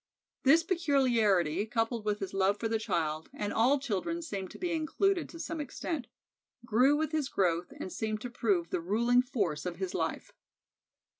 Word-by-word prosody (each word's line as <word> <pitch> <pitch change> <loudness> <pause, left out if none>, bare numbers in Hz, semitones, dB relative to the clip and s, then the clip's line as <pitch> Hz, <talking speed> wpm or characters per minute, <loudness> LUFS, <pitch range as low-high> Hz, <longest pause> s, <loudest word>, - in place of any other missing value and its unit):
This 315 +5 +5
peculiarity, 230 - +2
coupled 225 0 -1
with 210 -1 -1
his 195 - -4
love 195 +1 +2
for 225 - -1
the 225 0 0
child 160 -7 -2
and 205 0 -3
all 250 +6 +4
children 275 - -2
seemed 195 - -5
to - - -11
be 355 -1 -2
included 340 +4 +1
to 335 - -10
some 325 -1 -4
extent 290 0 -4 0.6
grew 250 +6 +4
with 310 -1 -1
his 305 -4 -1
growth 175 -5 0
and 185 - -5
seemed 215 -1 -2
to 245 - -5
prove 200 -8 0
the - - -1
ruling 235 +7 +3
force 200 - -2
of 180 -1 -3
his 190 -1 -3
life. - - -3
225 Hz, 175 wpm, -31 LUFS, 195-285 Hz, 0.6 s, This